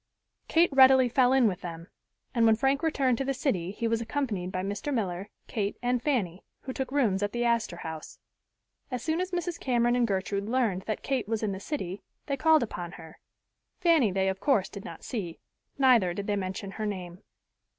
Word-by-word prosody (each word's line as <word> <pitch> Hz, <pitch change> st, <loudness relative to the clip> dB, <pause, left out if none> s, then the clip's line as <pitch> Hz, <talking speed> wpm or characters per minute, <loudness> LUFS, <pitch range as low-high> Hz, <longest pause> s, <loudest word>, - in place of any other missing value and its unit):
Kate 335 Hz, 0 st, +4 dB
readily 265 Hz, -1 st, +7 dB
fell 250 Hz, +1 st, +3 dB
in 265 Hz, -3 st, +5 dB
with 185 Hz, -3 st, -2 dB
them 165 Hz, -1 st, -7 dB, 0.5 s
and 230 Hz, -3 st, +4 dB
when 220 Hz, -, +6 dB
Frank 270 Hz, +4 st, +1 dB
returned 270 Hz, -7 st, +1 dB
to -, -, +1 dB
the 270 Hz, 0 st, -1 dB
city 205 Hz, -, -1 dB
he 220 Hz, +4 st, -2 dB
was 230 Hz, 0 st, 0 dB
accompanied 225 Hz, -7 st, -2 dB
by 185 Hz, 0 st, -2 dB
Mr. 205 Hz, +9 st, -3 dB
Miller, 195 Hz, -6 st, -2 dB, 0.2 s
Kate 205 Hz, -2 st, -2 dB
and 245 Hz, 0 st, 0 dB
Fanny, 205 Hz, -, -1 dB, 0.2 s
who 260 Hz, -, -6 dB
took 260 Hz, -1 st, -4 dB
rooms 225 Hz, -9 st, +2 dB
at 205 Hz, 0 st, -1 dB
the 240 Hz, 0 st, 0 dB
Astor 235 Hz, -6 st, +1 dB
House. 160 Hz, -2 st, -7 dB, 0.7 s
As 250 Hz, -3 st, -4 dB
soon 320 Hz, +2 st, 0 dB
as 370 Hz, -, -2 dB
Mrs. 350 Hz, -1 st, -3 dB
Cameron 240 Hz, -2 st, +2 dB
and 245 Hz, -1 st, +2 dB
Gertrude 200 Hz, +1 st, -2 dB
learned 230 Hz, -7 st, +1 dB
that 215 Hz, -, -3 dB
Kate 260 Hz, -6 st, -1 dB
was 225 Hz, 0 st, -2 dB
in 210 Hz, -, 0 dB
the 190 Hz, -, -5 dB
city, 200 Hz, -, -4 dB, 0.2 s
they 280 Hz, -, -1 dB
called 315 Hz, +1 st, +4 dB
upon 175 Hz, -6 st, -6 dB
her. 160 Hz, -1 st, -12 dB, 0.6 s
Fanny 330 Hz, -, +4 dB
they 190 Hz, +1 st, +1 dB
of 190 Hz, 0 st, -1 dB
course 205 Hz, -4 st, +2 dB
did 200 Hz, -2 st, -9 dB
not -, -, -9 dB
see, 180 Hz, -9 st, -4 dB, 0.4 s
neither 240 Hz, -10 st, +4 dB
did 200 Hz, -, -4 dB
they 205 Hz, -, 0 dB
mention 190 Hz, 0 st, -4 dB
her 215 Hz, +1 st, -3 dB
name. 185 Hz, -2 st, -6 dB
230 Hz, 200 wpm, -28 LUFS, 190-265 Hz, 0.7 s, readily